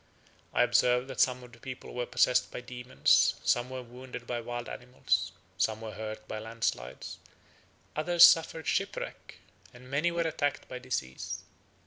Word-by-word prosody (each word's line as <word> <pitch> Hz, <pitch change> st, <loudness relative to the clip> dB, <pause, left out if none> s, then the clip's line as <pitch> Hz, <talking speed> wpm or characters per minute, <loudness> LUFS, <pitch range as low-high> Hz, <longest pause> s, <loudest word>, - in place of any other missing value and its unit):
I -, -, +4 dB
observed 125 Hz, +1 st, +3 dB
that 130 Hz, -, -6 dB
some 125 Hz, -1 st, +3 dB
of 125 Hz, -, -13 dB
the 120 Hz, -, -16 dB
people 130 Hz, +1 st, -8 dB
were 125 Hz, 0 st, -2 dB
possessed 125 Hz, 0 st, +3 dB
by -, -, -5 dB
demons, 125 Hz, +1 st, +2 dB
some 120 Hz, +1 st, +2 dB
were 130 Hz, -1 st, -5 dB
wounded 125 Hz, 0 st, -9 dB
by 120 Hz, 0 st, -3 dB
wild 120 Hz, 0 st, -5 dB
animals, 95 Hz, -7 st, -1 dB, 0.3 s
some 110 Hz, 0 st, +1 dB
were 110 Hz, -1 st, -6 dB
hurt 110 Hz, +1 st, -6 dB
by 110 Hz, -, -4 dB
landslides, 110 Hz, -, -4 dB, 0.8 s
others 170 Hz, +2 st, +5 dB
suffered 160 Hz, -1 st, +6 dB
shipwreck, -, -, -3 dB, 0.4 s
and 125 Hz, +1 st, -13 dB
many 150 Hz, +5 st, +2 dB
were 170 Hz, 0 st, -1 dB
attacked 150 Hz, -3 st, -1 dB
by 125 Hz, -, -6 dB
disease. 70 Hz, -, -4 dB
125 Hz, 155 wpm, -30 LUFS, 115-130 Hz, 0.8 s, suffered